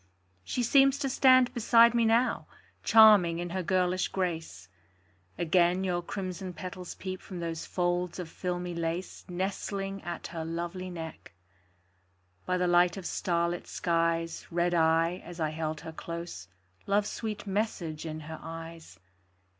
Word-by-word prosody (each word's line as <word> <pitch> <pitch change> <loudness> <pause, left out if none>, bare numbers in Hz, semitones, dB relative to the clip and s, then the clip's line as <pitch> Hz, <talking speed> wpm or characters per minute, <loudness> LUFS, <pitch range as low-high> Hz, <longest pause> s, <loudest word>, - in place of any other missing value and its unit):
She 245 - -2
seems 275 +3 +5
to 280 -1 -1
stand 255 -1 +5
beside 235 0 +5
me 235 -1 +3
now, 230 +3 +2 0.4
Charming 210 -7 +7
in 175 0 -4
her 185 +1 -1
girlish 185 0 +1
grace; 165 - -3 0.7
Again 175 +2 +2
your 180 -2 0
crimson 185 0 -5
petals 180 +2 -7
peep 185 -1 -6
From 185 -3 -8
those 165 -1 -4
folds 175 -1 -1
of 180 -3 -5
filmy 180 +1 -4
lace 170 +2 -4
Nestling 195 +2 -3
at 175 0 -6
her 165 -1 -3
lovely 170 +3 -4
neck. 160 - -8 1.1
By 185 0 +1
the 180 - +1
light 175 +1 +4
of 190 - -7
starlit 170 -1 -1
skies 165 -1 -1
Read 175 +1 +1
I, 165 +1 +2
as 175 0 -10
I 155 -1 0
held 155 -1 -3
her 160 - -7
close, 170 - -7 0.4
Love's 205 +1 +2
sweet 215 -3 -5
message 190 -6 -2
in 155 -1 -5
her 160 +1 -8
eyes. 165 0 -9
175 Hz, 145 wpm, -29 LUFS, 165-190 Hz, 1.1 s, Charming